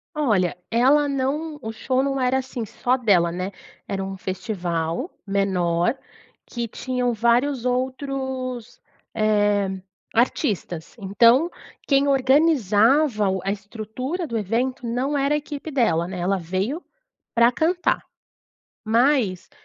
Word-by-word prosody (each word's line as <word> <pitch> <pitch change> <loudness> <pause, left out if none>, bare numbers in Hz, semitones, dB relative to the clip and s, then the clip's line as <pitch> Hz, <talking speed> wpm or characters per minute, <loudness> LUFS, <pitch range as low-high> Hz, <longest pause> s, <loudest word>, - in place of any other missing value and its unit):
Olha, 205 - +1
ela 275 +5 +4
não 290 +3 -2
o 220 - -4
show 255 +4 0
não 275 0 -1
era, 255 +1 +2
assim, 250 -3 -5
só 250 +4 0
dela 185 -9 +3
né. 185 +3 -4 0.4
Era 195 -1 -2
um 195 0 -5
festival 185 - -3
menor, 190 +1 +1 0.5
que 235 -1 -4
tinham 250 +1 -2
vários 240 +3 +1
outros, 255 -1 -3 0.3
eh, 205 -2 +2 0.5
artistas. 210 - -1
Então, 230 - +4 0.4
quem 280 0 +3
organizava 265 - +3
o 190 -1 -1
a 195 - 0
estrutura 220 - -5
do 230 -7 -3
evento 240 +5 -1
não 265 +5 -1
era 280 +2 +2
a - - +2
equipe 295 +1 -6
dela 175 -11 +2
né. 185 -1 -6
Ela 190 +3 +1
veio 190 - -3 0.5
pra 235 +1 +5
cantar, 350 +7 +1 0.8
mas 230 -4 +2
235 Hz, 120 wpm, -23 LUFS, 195-270 Hz, 0.8 s, pra